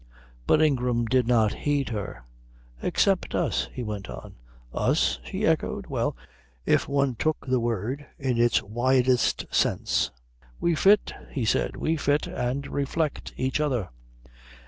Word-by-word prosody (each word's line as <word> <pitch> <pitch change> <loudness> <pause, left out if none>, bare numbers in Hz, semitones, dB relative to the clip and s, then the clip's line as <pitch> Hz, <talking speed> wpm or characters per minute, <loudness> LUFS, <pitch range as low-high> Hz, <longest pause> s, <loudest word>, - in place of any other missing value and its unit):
But 155 - +5
Ingram 125 -5 +1
did 125 0 +2
not 110 -4 +3
heed 145 -2 -1
her. 100 - -5 0.6
"Except - - +1
us," - - 0
he 125 - -5
went 105 -3 -5
on. 60 0 -8 0.4
"Us?" 60 0 +1
she - - -3
echoed. - - 0
Well, - - -2 0.5
if - - +2
one 140 -2 +1
took 155 +7 -1
the 130 -2 +1
word 120 +5 -2
in 130 -4 -1
its 120 0 +3
widest 125 +3 +2
sense. - - +1 0.5
"We 170 - +2
fit," 200 +5 +4 0.2
he 130 -5 -2
said. - - +1
"We 160 +1 0
fit, 145 0 +1
and 130 +3 -2
reflect 145 +2 -2
each 130 +3 0
other. 125 -10 0
125 Hz, 140 wpm, -26 LUFS, 115-140 Hz, 0.6 s, But